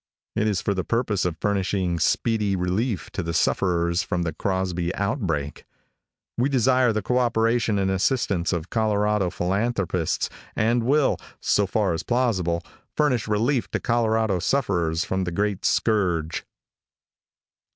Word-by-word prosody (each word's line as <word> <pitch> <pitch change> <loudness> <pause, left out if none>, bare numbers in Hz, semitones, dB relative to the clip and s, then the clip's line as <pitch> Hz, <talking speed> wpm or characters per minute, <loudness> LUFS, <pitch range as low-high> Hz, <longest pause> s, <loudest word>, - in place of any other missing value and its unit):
It 110 - +1
is 100 -5 0
for 100 - +1
the 95 -1 -2
purpose 115 -3 0
of 85 -2 -2
furnishing 95 -3 0
speedy 105 +4 +1
relief 95 +4 -1
to - - -3
the 85 -1 -3
sufferers 85 0 +1
from 90 -4 -2
the 80 -2 -2
Crosby 90 -1 -1
outbreak. 95 - -2 0.8
We 130 +3 +2
desire 130 -2 +3
the 110 -2 -2
cooperation 115 -2 +1
and 95 -1 +1
assistance 95 -3 0
of 85 -1 -3
Colorado 105 -3 +1
philanthropists, 95 -1 -1 0.3
and 120 +2 +2
will, 140 +2 +3 0.2
so 100 -1 +2
far 100 -3 +1
as 80 - -2
possible, 95 -9 0 0.3
furnish 130 -8 +1
relief 115 +5 +1
to - - -2
Colorado 110 -4 +1
sufferers 85 - 0
from 95 -2 -1
the 90 - -3
great 100 +2 -1
scourge. 90 -8 +1
100 Hz, 135 wpm, -24 LUFS, 90-115 Hz, 0.8 s, desire